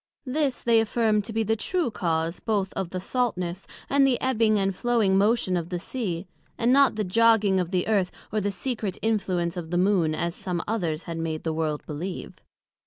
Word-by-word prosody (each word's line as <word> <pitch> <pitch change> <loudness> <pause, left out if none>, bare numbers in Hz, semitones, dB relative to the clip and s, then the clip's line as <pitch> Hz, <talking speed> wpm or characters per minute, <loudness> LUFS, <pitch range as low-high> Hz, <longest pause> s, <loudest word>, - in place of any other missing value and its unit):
This 275 0 -1
they 230 -1 +4
affirmed 220 -2 +1
to 225 - -4
be 225 0 0
the 220 +1 +1
true 335 - -1
cause 165 -3 -1
both 205 -4 -1
of 190 -3 -3
the 185 - -4
saltness, 185 -5 -2 0.2
and 280 0 +2
the 255 -2 +1
ebbing 225 -4 +2
and 195 -1 0
flowing 225 -4 +2
motion 200 -1 +2
of 170 -1 -2
the 180 - -2
Sea, 185 -3 -3 0.3
and 235 +2 +3
not 275 -3 +5
the 215 - -1
jogging 210 -1 +4
of 180 -2 -1
the 180 -1 0
Earth, 200 -4 +1 0.2
or 215 - 0
the 205 - 0
secret 215 -2 -3
influence 185 -6 0
of 165 -2 -5
the 175 - 0
Moon, 180 -4 +2
as 170 +1 -2
some 175 -2 -3
others 175 -7 -1
had 165 -1 -5
made 160 -1 -3
the 160 - -1
World 155 -2 -2
believe. 170 +5 -6
195 Hz, 200 wpm, -26 LUFS, 175-225 Hz, 0.3 s, not